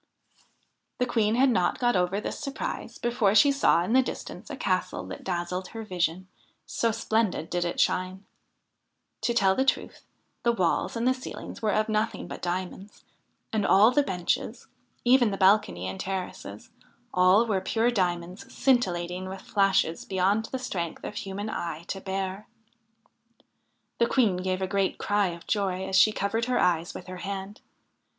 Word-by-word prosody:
The 250 - +1
Queen 225 -3 +1
had 260 +1 +4
not 180 -6 +1
got 240 -2 +2
over 180 +2 +1
this - - -5
surprise 275 -4 -5
before 235 -4 +1
she 280 +6 +7
saw 275 -11 +3
in 220 - -1
the 260 - +6
distance 255 - -7
a - - -5
castle - - -1
that - - -8
dazzled 180 0 -3
her 225 -1 -7
vision, 180 -2 -2 0.4
so 230 - 0
splendid 220 -6 -1
did 175 0 0
it 175 - -3
shine. 185 +2 0 1.0
To 235 - 0
tell 195 -4 +4
the 260 - +1
truth, 270 - -1 0.4
the 235 - +2
walls 185 0 0
and 230 +2 0
the 255 - +4
ceilings 255 0 -8
were 215 -2 +1
of 215 0 +1
nothing 215 0 -1
but - - -8
diamonds, 185 +3 -5 0.5
and 215 -2 +1
all 205 +4 +6
the 290 - +4
benches 180 -9 -2 0.4
even 245 -2 +5
the 195 - -3
balcony 190 - +3
and 95 0 -5
terraces 185 - -5 0.4
all 185 +5 +5
were 200 -4 0
pure 225 +5 +1
diamonds 185 +4 -2
scintillating 185 -8 0
with 190 0 -7
flashes 195 -5 +1
beyond 195 +3 +1
the 260 - -4
strength 175 -10 -4
of - - -5
human 200 0 -5
eyes 170 -5 -4
to 195 - -4
bear. 195 +1 -4 1.5
The 235 - +4
Queen 225 -9 +2
gave 185 +1 -2
a - - 0
great 195 0 0
cry 205 -1 +1
of 170 -1 -7
joy 190 -3 -1
as 190 - -2
she 190 +3 +6
covered 215 +3 -1
her 250 0 0
eyes 170 -1 +1
with 180 - -8
her 185 0 -8
hand. 195 +2 -6
195 Hz, 170 wpm, -27 LUFS, 180-225 Hz, 1.5 s, she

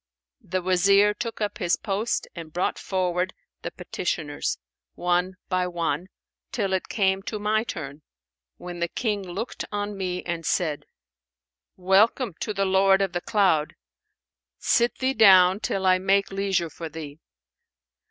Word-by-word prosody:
The 185 +1 -3
Wazir 195 +3 +4
took 230 0 -5
up 205 +1 -2
his 175 -4 +2
post 210 +3 -2
and 165 -2 -9
brought 180 +3 -1
forward 185 -1 -1 0.3
the - - -4
petitioners, 165 -4 -3 0.4
one 180 +1 0
by 185 -1 0
one, 170 -1 -2 0.4
till 200 -5 -1
it 190 - -1
came 195 -2 +1
to 215 +2 -5
my 215 +1 +1
turn, 150 -9 -7 0.6
when 175 -1 -8
the 170 - 0
King 210 +2 -2
looked 195 +6 -5
on 205 0 -3
me 180 -2 -3
and 170 -1 -4
said, 155 -3 -1 0.9
'Welcome 195 +4 +3
to - - -2
the 195 -1 0
'Lord 190 0 +4
of 195 - -2
the 175 - -2
Cloud'! 190 -9 +2 0.8
Sit 235 +1 +2
thee 265 0 0
down 190 -4 +7
till 195 -3 -2
I 185 0 +5
make 195 +1 +2
leisure 195 -4 0
for 165 +2 -7
thee.' 155 -1 -8
190 Hz, 145 wpm, -25 LUFS, 175-200 Hz, 0.9 s, down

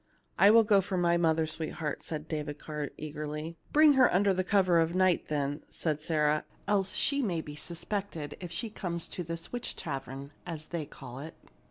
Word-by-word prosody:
"I 200 - +8
will 225 +1 +8
go 205 -2 +5
for 190 0 -3
my 170 -1 +3
mother, 160 -2 +3
sweetheart," 155 -1 -4
said 155 -1 -5
David 150 -2 -3
Carr, 150 -1 -4
eagerly. 150 +1 -5
" - - -32
Bring 305 0 +7
her 260 -2 +5
under 195 +2 +4
cover 185 -3 +4
of 165 +1 +1
night, 185 -2 +3
then," 145 -1 -1
said 155 -3 -1
Sarah; 150 -1 +1 0.2
"else 195 -2 +1
she 280 0 +2
may 185 -9 0
be 150 -2 -7
suspected 170 -1 -4
if 175 -2 -7
she 220 +6 -4
come 180 -5 -3
to 175 +1 -5
this 165 +1 -6
witch 245 - -3
tavern, 135 -1 -5
as 155 -2 -6
they 165 -4 -3
call 130 -3 -9
it. 155 +3 -8
165 Hz, 190 wpm, -30 LUFS, 150-185 Hz, 0.2 s, I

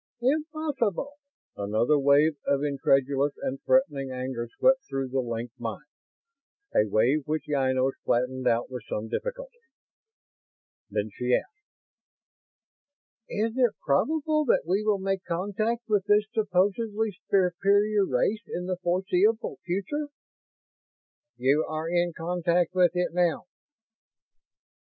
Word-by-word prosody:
"Impossible!" 285 - -1 0.4
Another 110 +9 +1
wave 145 +3 +4
of 140 0 +1
incredulous 140 0 +1
and 135 +1 -4
threatening 145 - +2
anger 125 -2 -4
swept 265 0 +4
through 135 -1 -2
the 135 +1 -1
linked 120 0 -4
minds; 115 +5 -5 0.9
a 105 - +3
wave 130 +8 +2
which 155 +1 -2
Ynos 130 -2 +1
flattened 125 +1 0
out 115 +2 +1
with 125 -1 -5
some 110 +1 -3
difficulty. - - -5 1.3
Then 105 +1 -2
she 125 +2 +1
asked: 420 +1 -6 1.6
"Is 220 +2 -1
it 245 -4 +2
probable 305 - +1
that 240 - +2
we 190 +5 +1
will 210 -1 +2
make 195 0 -2
contact 205 +7 -2
with 205 -3 +1
this 210 0 +4
supposedly 210 +1 0 0.2
superior 200 +2 +3
race 195 - 0
in 180 - -4
the 185 0 -2
foreseeable 185 +5 +1
future?" 200 +12 -2 1.3
"You 135 +5 +3
are 155 +1 -3
in 175 0 +1
contact 175 +1 0
with 180 -2 +3
it 180 -1 0
now." 175 -2 +1
175 Hz, 120 wpm, -27 LUFS, 135-215 Hz, 1.6 s, wave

